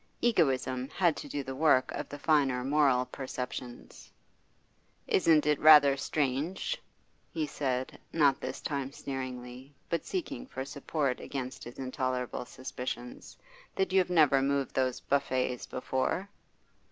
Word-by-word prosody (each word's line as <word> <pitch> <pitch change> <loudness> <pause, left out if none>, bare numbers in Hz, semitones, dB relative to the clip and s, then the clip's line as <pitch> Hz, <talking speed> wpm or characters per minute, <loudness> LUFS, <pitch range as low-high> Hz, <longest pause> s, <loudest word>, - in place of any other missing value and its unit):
Egoism 130 - +1
had 170 -1 +2
to - - -7
do 145 - -3
the 135 - -5
work 135 -2 +3
of - - -5
the 145 - -7
finer 140 -4 +2
moral 135 -2 +3
perceptions. 125 -2 -7 1.0
'Isn't 160 -5 +4
it 150 -1 +2
rather 150 -3 +8
strange,' 150 - -1 0.5
he 160 -2 -1
said, 130 -3 -3
not 145 -4 +3
this - - -5
time 140 -2 -3
sneeringly, 130 0 -7 0.2
but 170 - 0
seeking 285 -9 -4
for 130 - -5
support 140 -1 -2
against 130 -2 -5
his 120 - -10
intolerable 130 -2 -2
suspicions, 125 -1 -7 0.4
'that 190 -1 0
you 190 -1 +6
never 150 -6 +5
moved 140 -1 0
those 130 -1 0
buffets 130 -3 0
before? 130 +9 -2
135 Hz, 130 wpm, -30 LUFS, 130-150 Hz, 1.0 s, rather